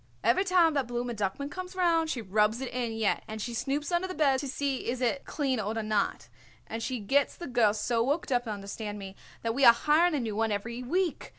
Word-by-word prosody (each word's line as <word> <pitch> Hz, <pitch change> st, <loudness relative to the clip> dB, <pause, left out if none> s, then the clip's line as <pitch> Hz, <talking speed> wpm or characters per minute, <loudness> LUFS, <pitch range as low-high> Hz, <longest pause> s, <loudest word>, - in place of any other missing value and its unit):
Every 240 Hz, +11 st, +3 dB
time 360 Hz, -4 st, +4 dB
that 275 Hz, -4 st, 0 dB
Blooma 240 Hz, 0 st, -3 dB
Duckman 210 Hz, +8 st, -3 dB
comes 370 Hz, +2 st, -7 dB
round 335 Hz, -3 st, +2 dB
she 240 Hz, -6 st, -3 dB
rubs 210 Hz, +3 st, +2 dB
it 265 Hz, -2 st, -5 dB
in 240 Hz, -2 st, -2 dB
yet, 225 Hz, -2 st, 0 dB
and 220 Hz, 0 st, -6 dB
she 235 Hz, +3 st, -4 dB
snoops 285 Hz, +6 st, -2 dB
under 360 Hz, +2 st, 0 dB
beds 275 Hz, -4 st, +3 dB
to 285 Hz, -, -4 dB
see 275 Hz, -2 st, -2 dB
is 245 Hz, +1 st, -2 dB
it 255 Hz, +2 st, 0 dB
clean 270 Hz, -5 st, -1 dB
oder 220 Hz, +2 st, -2 dB
not, 215 Hz, -, -1 dB, 0.4 s
and 225 Hz, +1 st, -5 dB
she 250 Hz, +1 st, -2 dB
gets 270 Hz, +7 st, +1 dB
the 345 Hz, -, -7 dB
girl 240 Hz, -6 st, +3 dB
so 230 Hz, +2 st, 0 dB
worked 285 Hz, +4 st, -1 dB
up, 245 Hz, -1 st, +1 dB
understand 205 Hz, 0 st, -5 dB
me, 195 Hz, -1 st, -8 dB, 0.3 s
that 230 Hz, 0 st, 0 dB
we 275 Hz, +3 st, 0 dB
are 235 Hz, -, +10 dB
hiring 310 Hz, +7 st, +3 dB
a -, -, 0 dB
new 225 Hz, -4 st, -3 dB
one 225 Hz, 0 st, +1 dB
every 235 Hz, +4 st, -3 dB
week. 345 Hz, +6 st, -1 dB
245 Hz, 225 wpm, -29 LUFS, 220-290 Hz, 0.4 s, are